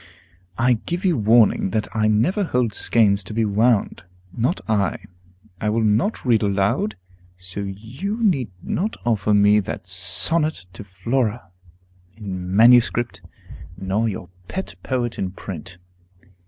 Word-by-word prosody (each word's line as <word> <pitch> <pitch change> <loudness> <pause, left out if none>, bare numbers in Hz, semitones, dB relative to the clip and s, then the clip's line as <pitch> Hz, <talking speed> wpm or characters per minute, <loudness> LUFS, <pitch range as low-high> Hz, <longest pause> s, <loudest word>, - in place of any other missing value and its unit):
I 120 -1 +2
give 175 +2 -3
you 180 -3 +3
warning 110 -3 +3
that 110 +2 -1
I 110 -1 +2
never 120 - +2
hold 125 - 0
skeins 100 -3 +2
to 105 - -7
be 115 -1 +1
wound, 110 +1 +1 0.3
not 125 +9 0
I. 105 -3 +1 0.6
I 105 - -1
will 110 +1 +1
not 110 - +1
read 115 -4 +3
aloud; 100 +1 0 0.4
so 90 +2 -7
you 115 - -5
need 140 - +1
not 210 +6 -2
offer 110 -3 +1
me 105 +1 +5
that 95 - -5
'Sonnet 95 - +1
to 100 - -9
Flora,' 105 +2 -2 0.7
in 95 -3 -5
manuscript, 120 -3 +4 0.6
nor 95 +4 -1
your 90 -3 -7 0.2
pet 190 0 -5
poet 120 -3 -2
in 95 -1 -3
print. 90 -2 -8
110 Hz, 135 wpm, -21 LUFS, 100-125 Hz, 0.7 s, me